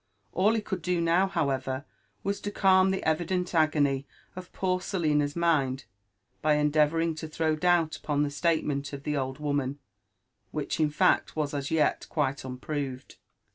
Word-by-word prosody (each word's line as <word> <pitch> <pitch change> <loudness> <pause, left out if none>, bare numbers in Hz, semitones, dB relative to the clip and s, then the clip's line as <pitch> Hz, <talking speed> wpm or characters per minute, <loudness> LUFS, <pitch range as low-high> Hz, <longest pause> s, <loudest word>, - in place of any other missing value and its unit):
All 210 +4 +3
he 220 - 0
could 190 -3 -4
dow 180 +2 0
do. 170 +3 +3
however, 135 -5 -1 0.4
was 200 +1 -2
to 205 - -3
calm 190 -2 +4
the 190 0 -1
evident 175 +3 0
agony 145 -4 +2 0.3
of 185 0 -9
poor 185 -1 0
Selina'i 155 -6 +1
asind 145 -5 +1 0.6
by 155 -1 +3
endeaTOuribg 155 +2 +2
to 160 - -5
th^w 155 0 -1
doobl 175 -2 +2
upon 145 -1 0
the 145 - 0
sCatemeiit 145 -3 -1
of 140 0 -6
the 150 - -1
old 130 -1 -2
woimb, 145 -2 -1 0.7
which - - -3
in 155 -1 +3
fact 150 - +2
was 150 -2 -1
as 140 -1 -3
yet 160 -2 +1
quite 140 -3 0
unpkx>ved. 130 0 -5
155 Hz, 160 wpm, -28 LUFS, 145-175 Hz, 0.7 s, calm